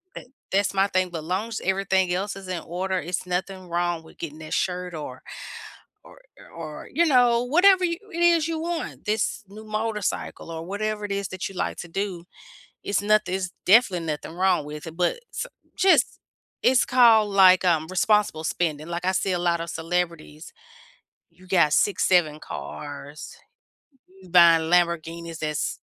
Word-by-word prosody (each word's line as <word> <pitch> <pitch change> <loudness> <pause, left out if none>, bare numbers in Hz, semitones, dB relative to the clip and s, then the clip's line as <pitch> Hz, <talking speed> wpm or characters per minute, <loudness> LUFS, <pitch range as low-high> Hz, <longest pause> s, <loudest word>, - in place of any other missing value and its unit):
that - - -9 0.2
that's 200 +1 +1
my 195 +1 +3
thing. 185 -1 0
But 160 -3 -6
long 190 +6 -2
as 225 - -5
everything 190 -1 +1
else 195 +2 -2
is 195 -1 -10
in 180 -3 -3
order, 185 +2 -2
it's 175 +1 -3
nothing 185 +1 -4
wrong 175 -1 -1
with 160 - -17
getting 155 -1 -7
that 155 - -7
shirt 180 -1 -2
or 130 -5 -7 0.8
or - - -16 0.3
o - - -19
or, 155 -2 -8
you 335 +5 +3
know, 245 -4 +4
whatever 365 +7 +5
you 335 0 -1
it 340 +1 -2
is 335 -2 +4
you 325 -1 -2
want. 335 -1 -4
This 215 +1 -1
new 215 +2 -11
motorcycle 215 -5 -3
or 165 0 -6
whatever 210 +2 -3
it 200 - -3
is 200 -1 -2
that 185 -1 -5
you - - -12
like - - -2
to 175 - -7
do, 185 -1 -4 0.6
it's 200 0 -1
nothin 215 -2 +2
it's 185 -2 -2 0.2
definitely 190 -5 +4
nothing 155 +1 -4
wrong 180 -3 +1
with 150 +2 -8
it, 165 0 -9
but 180 - 0
s - - -4 0.3
just 380 -1 +3 0.4
it's 250 -1 +4
called, 225 -5 +5
like, 185 -1 +6
um, 160 -2 +2
responsible 190 -3 +1
spending, 160 -1 -2
like, 170 +1 -4
I 185 - +2
see 190 +1 0
a 175 - 0
lot 170 -1 0
of 170 - -5
celebrities 165 -2 -4 0.8
you 185 0 -19
got 170 -5 +3
6, 205 - +2
7 155 -4 +2
cars, 145 +1 -8 0.9
buying 165 -2 +6
Lamborghinis 170 -1 0
that's 150 -1 -2
185 Hz, 175 wpm, -24 LUFS, 170-210 Hz, 0.9 s, like